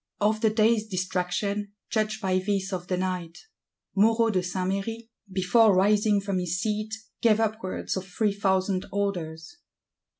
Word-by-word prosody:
Of 215 +1 +1
the 220 - +4
day's 220 0 +2
distraction 195 +2 -2 0.2
judge 215 0 0
by 185 -2 +1
this 195 0 -1
of 180 -1 -4
the 180 - 0
night: 180 -2 -3 0.6
Moreau 225 +3 +4
de 185 -3 +1
Saint 180 +1 -2
Méry, 225 +4 -4 0.2
"before 195 +3 +4
rising 205 +2 +3
from 195 -1 -1
his 180 0 -2
seat, 215 +2 -2 0.3
gave 220 -2 +4
upwards 220 -3 -2
of 190 0 -4
three 205 +2 0
thousand 190 -1 0
orders." 175 - -3
200 Hz, 145 wpm, -26 LUFS, 185-215 Hz, 0.6 s, the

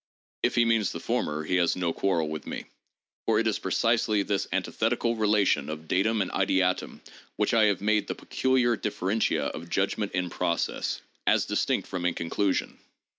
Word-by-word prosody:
If - - +1
he 120 - +4
means 115 -2 +2
the - - -5
former, 75 +1 -1
he 90 +4 0
has 85 -2 +2
no 90 -2 -1
quarrel 85 -5 0
with 75 0 -6
me, - - -5 0.6
for 110 - +3
it 115 - +2
is 110 -2 +1
precisely 110 +1 +1
this 100 0 -1
antithetical 115 +1 0
relation 105 -5 +2
of 80 +1 -6
datum 105 +4 +2
and - - -6
ideatum 95 -1 0 0.3
which - - 0
I 110 -2 +5
have 100 -3 +1
made 105 0 +1
the - - -3
peculiar 130 -2 +1
differentia 105 0 0
of 85 +2 -5
judgment 100 +3 -1
in 90 -1 -1
process, 85 - -1 0.3
as - - +4
dis - - 0
tinct - - 0
from 90 -1 -2
inconclusion. 90 +3 -1
100 Hz, 175 wpm, -27 LUFS, 90-110 Hz, 0.6 s, I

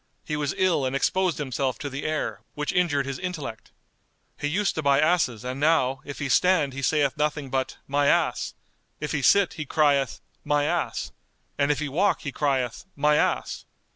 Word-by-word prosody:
He 150 - -2
was 145 -2 -2
ill 180 -6 +2
and 130 +1 -1
exposed 185 +3 +1
himself 130 -3 -2
to 145 - -5
the 140 +1 -5
air, 155 0 -2
which 150 0 -2
injured 155 -6 +2
his 135 -1 -4
intellect. 170 -11 -6 0.6
He 145 - -3
used 195 +6 +1
to 160 - -2
buy 140 -2 +3
asses 155 -9 +1
and 130 +2 -4
now, 140 -4 +2
if 145 - -8
he 145 - -3
stand 155 -2 +3
he 135 - -5
saith 145 0 +1
nothing 150 -2 -1
but, 130 -1 -1
My 145 +1 +1
ass! - - +1 0.4
if 150 - -3
he 150 - -1
sit 200 +9 +4
he 155 -3 -5
crieth, 140 -4 +2 0.2
My 145 0 +1
ass! 145 - -1 0.4
and 140 0 +1
if 145 - 0
he 150 - -2
walk 180 +9 +1
he 145 - -4
crieth, 130 -4 -1
My 150 +1 +3
ass! - - 0
145 Hz, 190 wpm, -25 LUFS, 135-155 Hz, 0.6 s, sit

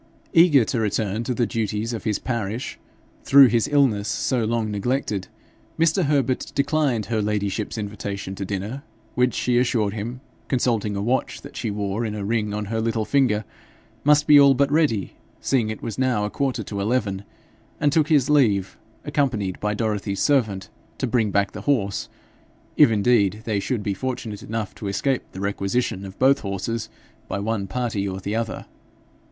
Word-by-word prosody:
Eager 165 - +6
to 105 +4 -1
return 110 0 -1
to 120 - -3
the 120 - +2
duties 110 +1 -2
of 110 - -6
his 105 -3 +1
parish, 115 -1 -4 0.4
through 140 0 +8
his 120 +1 +2
illness 135 -8 +2
so 125 -3 0
long 110 -1 -1
neglected, 105 -2 -1 0.5
Mr. 165 +2 +3
Herbert 135 -3 0
declined 140 -6 +1
her 110 +1 -1
ladyship's 105 +1 -2
invitation 100 -2 -5
to 95 - -5
dinner, 100 +7 -4 0.3
which, 125 -1 +1
she 120 -1 +2
assured 115 -5 +1
him, 115 +4 -5 0.3
consulting 115 -5 0
a 100 - -2
watch 125 +4 -1
that - - -12
she 115 - -3
wore 100 +1 -2
in 105 -2 -3
a 100 -2 -4
ring 105 -1 0
on 105 0 -3
her 110 +2 -2
little 115 -1 -1
finger, 110 -7 +2 0.6
must 150 0 +4
be 150 -1 +8
all 140 -1 +7
but 140 +2 +2
ready, 145 -10 +1 0.3
seeing 120 -5 +1
it 110 - -6
was 115 +2 -5
now 125 -5 +1
a 105 - -4
quarter 130 -5 -1
to 100 0 -5
eleven, 100 -2 -1 0.6
and 145 -1 +2
took 155 -1 +3
his 145 -5 +3
leave, 110 -10 +2 0.3
accompanied 125 -11 -1
by 105 0 -1
Dorothy's 105 -3 -2
servant 110 -10 +1 0.3
to - - -1
bring 115 -3 +1
back 100 0 +1
the - - -7
horse 105 -9 0 0.7
if 150 -4 +7
indeed 105 -1 +2
they 105 -3 0
should 110 +1 -2
be 100 - -1
fortunate 120 -2 -4
enough 110 -2 -4
to 105 - -7
escape 130 +6 0
the 95 - -8
requisition 100 0 -1
of 95 0 -10
both 135 +2 +4
horses 110 +3 -3 0.4
by - - -3
one 100 -1 -2
party 110 -2 -2
or 95 0 -4
the 100 +3 -3
other. 115 0 -3
110 Hz, 175 wpm, -23 LUFS, 100-130 Hz, 0.7 s, through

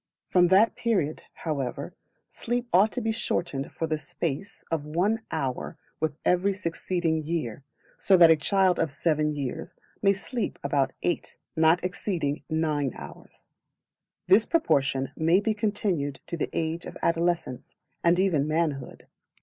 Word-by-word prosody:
From 180 -1 +5
that 195 +5 +5
period, 190 -10 0 0.2
however, 140 -6 -3 0.3
sleep 240 +1 -3
ought 195 +5 +5
to 250 - -2
be 225 0 0
shortened 175 - -2
for 165 - -3
the 155 -1 -1
space 165 +5 -5
of 160 -3 0
one 180 +9 0
hour 130 -2 -3 0.2
with 155 -2 -1
every 180 +3 +3
succeeding 170 -3 -1
year, 145 -6 -3 0.4
so 190 - +5
that 170 -2 +8
a - - +7
child 185 +4 +2
of 160 - 0
seven 150 0 0
years 135 -4 -5
old - - -35
may 200 -1 +5
sleep 225 +4 -4
about 140 -1 +1
eight, 175 - -2 0.2
and 160 - -1
not 165 +3 +4
exceeding 180 -5 -2
nine 155 -4 0
hours: 70 - -12 0.8
this 210 +4 +5
proportion 135 - +1
may 165 +4 +3
be 215 +1 0
continued 200 - -1
to - - -4
the 165 - -2
age 165 +1 -2
of - - -8
adolescence, 170 -6 -1 0.3
and 170 +1 +4
even 170 -7 +2
manhood. 155 -3 -2
165 Hz, 150 wpm, -27 LUFS, 150-190 Hz, 0.8 s, that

